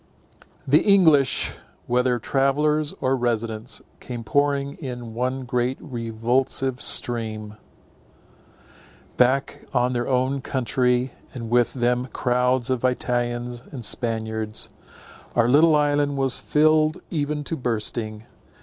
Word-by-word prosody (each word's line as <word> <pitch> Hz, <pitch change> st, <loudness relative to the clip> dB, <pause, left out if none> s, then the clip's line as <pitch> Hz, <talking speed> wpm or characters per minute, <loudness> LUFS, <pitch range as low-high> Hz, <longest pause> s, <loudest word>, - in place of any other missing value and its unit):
The 145 Hz, +3 st, +6 dB
English, 160 Hz, -10 st, +4 dB, 0.3 s
whether 125 Hz, 0 st, +1 dB
travellers 145 Hz, +5 st, +1 dB
or 130 Hz, +1 st, +2 dB
residents, 115 Hz, -2 st, -2 dB, 0.2 s
came 120 Hz, -2 st, -7 dB
pouring 140 Hz, +3 st, +1 dB
in 125 Hz, -5 st, -7 dB
one 130 Hz, +2 st, -2 dB
great 125 Hz, +1 st, -1 dB
revulsive 125 Hz, +2 st, -1 dB
stream, 110 Hz, -3 st, -1 dB, 1.6 s
back 130 Hz, +2 st, +2 dB
on 125 Hz, +1 st, +2 dB
their 120 Hz, -1 st, -1 dB
own 130 Hz, +1 st, 0 dB
country; 125 Hz, 0 st, 0 dB, 0.2 s
and 115 Hz, -2 st, -6 dB
with 120 Hz, +1 st, +2 dB
them 125 Hz, 0 st, +1 dB
crowds 125 Hz, 0 st, +1 dB
of 130 Hz, -2 st, -1 dB
Italians 120 Hz, -1 st, -1 dB
and 125 Hz, -5 st, -5 dB
Spaniards. 110 Hz, -2 st, -1 dB, 0.7 s
Our 115 Hz, -1 st, +4 dB
little 155 Hz, +5 st, +5 dB
island 145 Hz, -1 st, +1 dB
was 135 Hz, -2 st, +2 dB
filled 155 Hz, +1 st, +3 dB
even 150 Hz, -2 st, -2 dB
to 165 Hz, -, -2 dB
bursting. 110 Hz, -3 st, -2 dB
125 Hz, 110 wpm, -23 LUFS, 120-140 Hz, 1.6 s, The